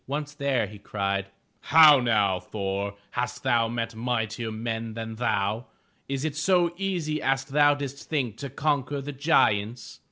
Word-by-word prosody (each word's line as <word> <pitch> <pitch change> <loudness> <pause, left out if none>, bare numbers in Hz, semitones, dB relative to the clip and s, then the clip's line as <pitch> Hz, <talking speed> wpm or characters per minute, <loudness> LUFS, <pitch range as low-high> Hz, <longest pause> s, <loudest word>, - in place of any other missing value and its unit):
Once 145 +2 -4
there, 140 -5 0
he 105 0 -11
cried: 100 -1 -2 0.3
"How 155 -3 +7
now, 105 -6 +2
Thor, 100 +1 -4 0.2
hast 125 0 -3
thou 115 -1 +2
met 115 0 -3
mightier 115 -1 -2
men 115 0 -4
than 115 -1 -6
thou? 110 0 -1 0.4
Is 135 +1 -2
it 155 -2 -2
so 175 +2 +2
easy 175 -5 -2
as 135 0 +1
thou 145 +1 +4
didst 140 -1 -7
think 130 -8 -1
to 140 - -6
conquer 145 0 -1
the 140 +1 -5
giants?" 120 -6 +1
125 Hz, 155 wpm, -26 LUFS, 110-145 Hz, 0.4 s, How